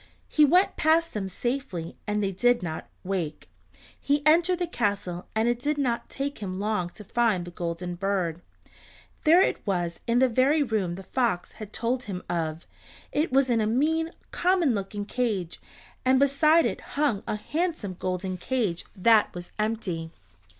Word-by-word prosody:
He 305 - +5
went 360 +7 +3
past 325 +1 +3
them 195 -3 -3
safely 240 - -3
and 210 0 0
they 195 - 0
did 245 +4 +2
not 160 -2 -5
wake. 180 -5 -3 0.5
He 285 0 0
entered 345 +4 +4
the 355 - 0
castle 200 - -2
and 220 +1 +2
it 240 0 +1
did 290 +4 -1
not 245 -5 -1
take 280 +1 -4
him 190 -2 -4
long 205 -4 -1
to 210 - -9
find 210 -4 +1
the 175 - -8
Golden 175 +1 -4
Bird. 175 -3 -1 0.8
There 340 +5 +7
it - - 0
was 175 -4 -1
in 235 +1 +2
the 260 +1 +5
very 265 +6 +3
room 210 -8 -1
the 190 - -8
fox 230 -5 -1
had 215 -1 -9
told 245 +3 -1
him 185 -4 -5
of. 165 -2 -2 0.5
It 300 0 0
was 270 0 +4
in 230 -2 +3
a 215 - +1
mean, 315 +8 +1 0.2
common 355 -7 +2
looking 205 0 -3
cage, 210 -8 -2 0.4
and 260 +1 +4
beside 305 +4 +4
it - - -2 0.2
hung 285 -9 +2
a - - -1
handsome 300 - -2
golden 185 0 -2
cage 205 -4 -1
that 215 +2 +4
was 175 0 -7
empty. 210 -7 -2
220 Hz, 170 wpm, -27 LUFS, 185-275 Hz, 0.8 s, There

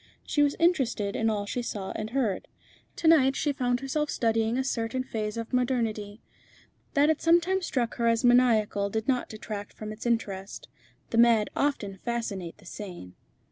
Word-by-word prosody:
She 295 - +1
was 290 -1 +3
interested 260 - +1
in 225 - +1
all 205 -2 -1
she 245 +4 -3
saw 205 -5 -4
and 215 0 -4
heard. 230 -6 -1 0.5
To 330 - -1
night 270 -5 +5
she 290 - 0
found 245 -1 0
herself 300 +2 -1
studying 225 0 +1
a 265 - +1
certain 255 -1 -2
phase 215 -4 -4
of 230 +1 -5
modernity. 230 -4 -1 0.7
That 295 +2 +5
it 315 - -2
sometimes 345 +2 +3
struck 245 -5 -1
her 235 - +1
as 230 +1 +2
maniacal 225 -5 +4
did 220 +2 -3
not 255 -2 0
detract 210 -1 -7
from 215 0 -7
its 215 +3 -6
interest. 200 -4 -2 0.4
The 230 - +2
mad 230 -3 +5
often 210 -9 -1
fascinate 205 -8 -4
the 205 - -19
sane. 175 - -8
230 Hz, 175 wpm, -28 LUFS, 210-265 Hz, 0.7 s, night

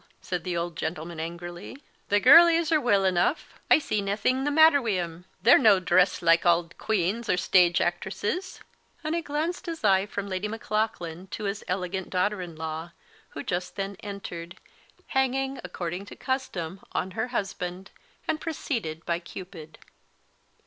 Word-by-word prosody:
said 180 -3 -4
the 175 -1 -2
old 170 0 -3
gentleman 165 +1 -4
angrily; 175 +6 -7 0.3
"the 205 - +4
girlies 335 - +7
are 310 -2 +4
weel 200 -5 +3
eneugh; 185 - +2 0.3
I - - +8
see 215 -9 -1
naething 215 +7 0
the - - +2
matter 315 -1 +6
wi' 225 -5 0
them; 170 -1 -4 0.2
they're 235 - +7
no 215 -7 +6
dresse 180 0 +2
like 165 0 +5
auld 170 0 +2
queens 215 +2 -1
or 180 - +3
stage 180 -2 +4
actresses;" 205 - -2 0.4
and 310 +1 -2
he 340 - 0
glance 315 +4 -2
his 335 -6 -6
eye 195 -1 +4
from 200 -1 -4
Lady 190 +1 -2
Maclaughlan 210 -5 -3
to 215 - -6
his 200 0 -3
elegant 185 0 -3
daughter 190 +2 0
in 175 -2 -7
law, 160 +2 -5 0.4
who 145 - -4
just 180 +1 -3
then 195 0 -3
entered, 180 -4 -7 0.5
hanging, 265 0 0
according 180 +2 -5
to - - -10
custom, 195 -10 -3
on 185 - -2
her 245 - -2
husband, 190 -5 -4 0.4
and 310 - -1
preceded 225 - -4
by 170 0 0
Cupid. 175 -3 -10
190 Hz, 160 wpm, -27 LUFS, 175-235 Hz, 0.5 s, I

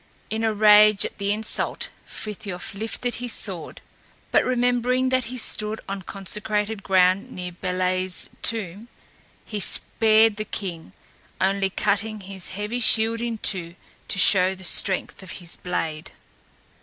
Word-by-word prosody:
In 220 +1 -2
a 225 - +2
rage 210 -1 +6
at - - -7
the 200 0 0
insult 215 +1 -2 0.2
Frithiof 200 -3 -6
lifted 225 +4 -3
his 245 +1 -2
sword; - - -3 0.5
but - - +4
remembering 250 +1 +1
that 255 -1 +1
he 255 +3 -6
stood 215 -2 +2
on 195 0 -4
consecrated 210 +3 -2
ground 185 0 +3
near 180 -1 -6
Bélé's 185 0 -1
tomb, 215 -1 -2 0.6
he 210 - -4
spared 220 +1 +4
the 215 - -2
king, 175 - -6 0.5
only 195 +1 +1
cutting 210 +2 -1
his 190 -1 -5
heavy 210 +4 -3
shield 225 0 +3
in 235 -1 -2
two 175 -5 -3 0.3
to - - -2
show 185 0 +4
the 190 - -13
strength 190 +2 0
of 190 - -9
his 175 -2 -6
blade. 160 -3 -4
205 Hz, 140 wpm, -24 LUFS, 185-220 Hz, 0.6 s, rage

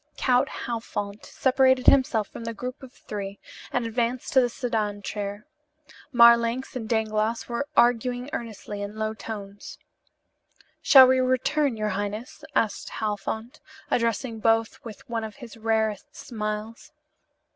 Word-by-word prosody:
Count 255 +1 +2 0.2
Halfont 215 -3 -4
separated 260 -1 +3
himself 245 -6 +4
from - - -9
the 230 0 -4
group 250 +4 -6
of 260 -2 -11
three 200 -4 -7 0.3
and 245 -1 0
advanced 235 +2 -2
to 260 - +6
the 245 - +1
sedan 215 -4 -2
chair. 205 0 -5 0.7
Marlanx 235 +1 +5
and 225 -4 -5
Dangloss 220 0 0
were 245 +4 -3
arguing 245 +1 +3
earnestly 210 -3 -6
in 205 +1 -5
low 215 0 -1
tones. 205 -2 -8 1.0
"Shall 265 -2 +9
we 260 0 +4
return, 255 +1 +1
your 215 0 -1
highness?" 205 +8 -4
asked 215 -3 0
Halfont, 220 +2 -4 0.3
addressing 230 0 0
both 225 0 +1
with 220 -3 -10
one 230 -1 -3
of 215 -1 -7
his 245 -5 -11
rarest 220 -2 -1
smiles. 215 +4 -5
230 Hz, 135 wpm, -25 LUFS, 215-245 Hz, 1.0 s, Shall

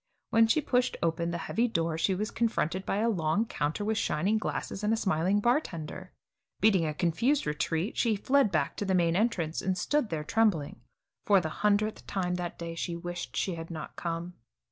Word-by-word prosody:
When 225 0 +5
she 305 +7 +3
pushed 250 -2 +1
open 170 0 0
the 170 - -2
heavy 235 +2 +1
door 165 -6 -1
she 185 +4 +1
was 210 +4 -2
confronted 190 -5 -1
by - - 0
a 220 +2 +2
long 185 0 +1
counter 160 0 -2
with 220 0 0
shining 195 +8 +1
glasses 210 -1 -4
and 210 - +2
a 225 - +2
smiling 190 0 +1
bartender. 185 - -1 0.5
Beating 195 -6 +4
a 155 - -2
confused 230 - +1
retreat, 160 +5 -1
she 230 -3 +2
fled 260 +2 +2
back 155 -5 0
to 205 - -2
the 190 -1 +1
main 170 -2 +2
entrance, 180 -7 0
and 190 -1 -1
stood 270 +5 0
there 155 -2 -2
trembling. 165 - +1 0.5
For 200 -2 +6
the 160 -3 -3
hundredth 210 +4 0
time 180 -2 -1
that 175 -1 -4
day 170 0 -5
she 170 +1 -3
wished 175 +1 -6
she 190 - 0
had 165 -1 -7
not 165 -2 -7
come. 170 +1 -4
185 Hz, 195 wpm, -29 LUFS, 165-220 Hz, 0.5 s, For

